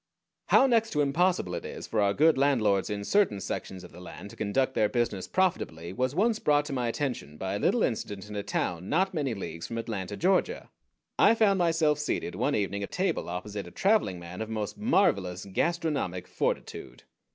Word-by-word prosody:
How 265 Hz, -, +6 dB
next 230 Hz, -4 st, +3 dB
to 150 Hz, -, +2 dB
impossible 150 Hz, -, +1 dB
it 85 Hz, -, -4 dB
is -, -, -7 dB
for 110 Hz, -, 0 dB
our 100 Hz, 0 st, +2 dB
good 160 Hz, +1 st, +5 dB
landlords 120 Hz, -8 st, +2 dB
in 105 Hz, -1 st, -3 dB
certain 185 Hz, -, +2 dB
sections 95 Hz, -1 st, -5 dB
of 90 Hz, -, -12 dB
the 90 Hz, -, -12 dB
land 100 Hz, +3 st, -9 dB
to -, -, -12 dB
conduct 130 Hz, +6 st, 0 dB
their 105 Hz, -4 st, +2 dB
business 115 Hz, -6 st, -1 dB
profitably 90 Hz, -, -1 dB
was 130 Hz, +5 st, -1 dB
once 220 Hz, +4 st, +2 dB
brought 145 Hz, 0 st, +2 dB
to 140 Hz, -, -5 dB
my 125 Hz, -2 st, -1 dB
attention 115 Hz, -, -3 dB
by 95 Hz, +3 st, -3 dB
a 100 Hz, -, -2 dB
little 235 Hz, -, +2 dB
incident 105 Hz, -3 st, -3 dB
in 105 Hz, -, -8 dB
a 100 Hz, -, -1 dB
town 90 Hz, -2 st, -3 dB
not 190 Hz, +4 st, +1 dB
many 140 Hz, -8 st, -1 dB
leagues 85 Hz, -4 st, -6 dB
from 115 Hz, -, -5 dB
Atlanta, 105 Hz, -4 st, -4 dB
Georgia. 195 Hz, -, +1 dB, 0.5 s
I 230 Hz, -, +6 dB
found 200 Hz, -4 st, +3 dB
myself 165 Hz, -3 st, +2 dB
seated 150 Hz, -, -2 dB
one -, -, 0 dB
evening 100 Hz, -1 st, -1 dB
at 100 Hz, -, -4 dB
table 185 Hz, -, -1 dB
opposite 100 Hz, +2 st, -5 dB
a -, -, -11 dB
traveling 195 Hz, -, +2 dB
man 85 Hz, +3 st, -8 dB
of 110 Hz, -, -4 dB
most 110 Hz, -2 st, -3 dB
marvelous 105 Hz, -, +1 dB
gastronomic 140 Hz, -, -1 dB
fortitude. -, -, -3 dB
115 Hz, 195 wpm, -28 LUFS, -, 0.5 s, How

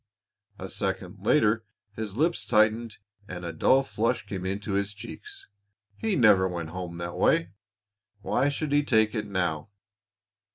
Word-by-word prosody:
A 95 Hz, -, -6 dB
second 95 Hz, 0 st, -3 dB
later 110 Hz, -2 st, +3 dB, 0.3 s
his 110 Hz, -1 st, -5 dB
lips 165 Hz, +4 st, +1 dB
tightened 110 Hz, 0 st, +2 dB, 0.3 s
and 90 Hz, -1 st, -7 dB
a 85 Hz, -, -4 dB
dull 135 Hz, +1 st, +4 dB
flush 115 Hz, -1 st, -1 dB
came 95 Hz, -2 st, -4 dB
into 100 Hz, +2 st, -3 dB
his 100 Hz, +1 st, -1 dB
cheeks. 390 Hz, -, -9 dB, 0.5 s
He 220 Hz, -, -1 dB
never 105 Hz, -6 st, +5 dB
went 85 Hz, -3 st, -4 dB
home 90 Hz, -1 st, -6 dB
that 85 Hz, 0 st, -5 dB
way, 85 Hz, +2 st, +2 dB, 0.7 s
why 135 Hz, +7 st, +1 dB
should 145 Hz, +1 st, -3 dB
he 145 Hz, 0 st, +4 dB
take 110 Hz, -5 st, +3 dB
it 105 Hz, -2 st, -3 dB
now? 90 Hz, -5 st, -2 dB
105 Hz, 150 wpm, -27 LUFS, 95-120 Hz, 0.7 s, never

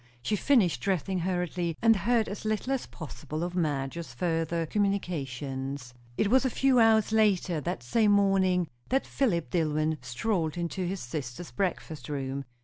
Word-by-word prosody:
She 210 Hz, -, +1 dB
finished 210 Hz, -, +3 dB
dressing 190 Hz, -1 st, 0 dB
hurriedly, 175 Hz, -2 st, -1 dB
and 225 Hz, 0 st, +5 dB
heard 225 Hz, +3 st, +2 dB
as 200 Hz, -, -6 dB
little 215 Hz, +5 st, -1 dB
as 265 Hz, -, -2 dB
possible 155 Hz, +1 st, -6 dB
of 175 Hz, 0 st, -3 dB
Madge's 150 Hz, -3 st, -2 dB
further 165 Hz, +1 st, 0 dB
communications. 140 Hz, -9 st, -2 dB, 0.2 s
It 210 Hz, -, +2 dB
was 260 Hz, +1 st, +5 dB
a 260 Hz, -, +2 dB
few 265 Hz, 0 st, +3 dB
hours 220 Hz, -2 st, +5 dB
later, 195 Hz, -7 st, +2 dB
that 120 Hz, -, -3 dB
same 210 Hz, -, +3 dB
morning, 190 Hz, -3 st, +3 dB, 0.2 s
that 265 Hz, +1 st, +1 dB
Philip 180 Hz, -, 0 dB
Dillwyn 155 Hz, -2 st, +1 dB
strolled 160 Hz, -, -1 dB
into 175 Hz, +2 st, -2 dB
his 190 Hz, +1 st, -3 dB
sister's 125 Hz, +5 st, -6 dB
breakfast 175 Hz, -6 st, -3 dB
room. 135 Hz, -1 st, -3 dB
175 Hz, 150 wpm, -29 LUFS, 150-205 Hz, 0.2 s, and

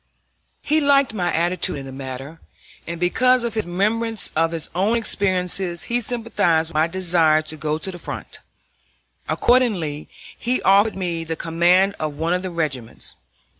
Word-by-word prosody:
He 310 Hz, +1 st, +2 dB
liked 280 Hz, -3 st, +4 dB
my 175 Hz, -5 st, 0 dB
attitude 170 Hz, -1 st, 0 dB
in 135 Hz, -, -7 dB
the 135 Hz, -, -8 dB
matter, 135 Hz, +3 st, -7 dB, 0.5 s
and 170 Hz, 0 st, -5 dB
because 250 Hz, +8 st, +3 dB
of 235 Hz, -2 st, -2 dB
his 220 Hz, -4 st, -2 dB
remembrance 215 Hz, +5 st, 0 dB
of 165 Hz, +1 st, +2 dB
his 165 Hz, -2 st, -4 dB
own 200 Hz, +7 st, +2 dB
experiences 185 Hz, -4 st, -1 dB
he 240 Hz, +1 st, -1 dB
sympathized 200 Hz, -9 st, 0 dB
with -, -, -14 dB
my 155 Hz, +1 st, +3 dB
desire 165 Hz, -3 st, +2 dB
to 155 Hz, -, -5 dB
go 155 Hz, 0 st, -2 dB
to 190 Hz, +4 st, -5 dB
the 175 Hz, -, -9 dB
front. -, -, -7 dB, 0.9 s
Accordingly 195 Hz, -13 st, +1 dB, 0.3 s
he 250 Hz, +1 st, -1 dB
offered 200 Hz, +2 st, +4 dB
me 170 Hz, -3 st, -2 dB
the 165 Hz, 0 st, -4 dB
command 175 Hz, +4 st, +3 dB
of 155 Hz, -2 st, -2 dB
one 165 Hz, +3 st, 0 dB
of 180 Hz, -, 0 dB
the 185 Hz, -, -4 dB
regiments. 145 Hz, -9 st, -4 dB
175 Hz, 165 wpm, -22 LUFS, 160-215 Hz, 0.9 s, liked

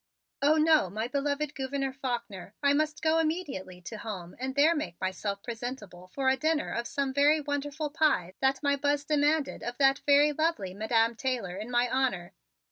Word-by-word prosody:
"Oh, 295 Hz, +2 st, +4 dB
no, 310 Hz, -, +4 dB
my 215 Hz, +5 st, -3 dB
beloved 285 Hz, +2 st, -1 dB
Gouverneur 270 Hz, 0 st, -3 dB
Faulkner; 235 Hz, -7 st, -5 dB
I 280 Hz, 0 st, +5 dB
must 305 Hz, +2 st, -1 dB
go 320 Hz, 0 st, +3 dB
immediately 280 Hz, -, -3 dB
to 215 Hz, +4 st, -8 dB
home 185 Hz, -6 st, -7 dB
and 260 Hz, +1 st, -3 dB
there 300 Hz, +4 st, +5 dB
make 180 Hz, -, -4 dB
myself 200 Hz, +2 st, -3 dB
presentable 225 Hz, -6 st, -7 dB
for 265 Hz, +8 st, -3 dB
a 265 Hz, -, +5 dB
dinner 310 Hz, +3 st, 0 dB
of 235 Hz, 0 st, -2 dB
some 275 Hz, -2 st, -2 dB
very 290 Hz, +3 st, +4 dB
wonderful 290 Hz, +1 st, -3 dB
pie 300 Hz, -, +1 dB
that 265 Hz, +1 st, +1 dB
my 285 Hz, 0 st, +3 dB
Buzz 285 Hz, 0 st, 0 dB
demanded 295 Hz, 0 st, +1 dB
of 240 Hz, +1 st, -5 dB
that 275 Hz, 0 st, +3 dB
very 290 Hz, +1 st, +6 dB
lovely 310 Hz, -, -1 dB
Madam 225 Hz, +3 st, +1 dB
Taylor 235 Hz, -8 st, -2 dB
in 210 Hz, +4 st, -6 dB
my 245 Hz, 0 st, +2 dB
honor. 245 Hz, -9 st, -1 dB
270 Hz, 180 wpm, -29 LUFS, 220-295 Hz, -, very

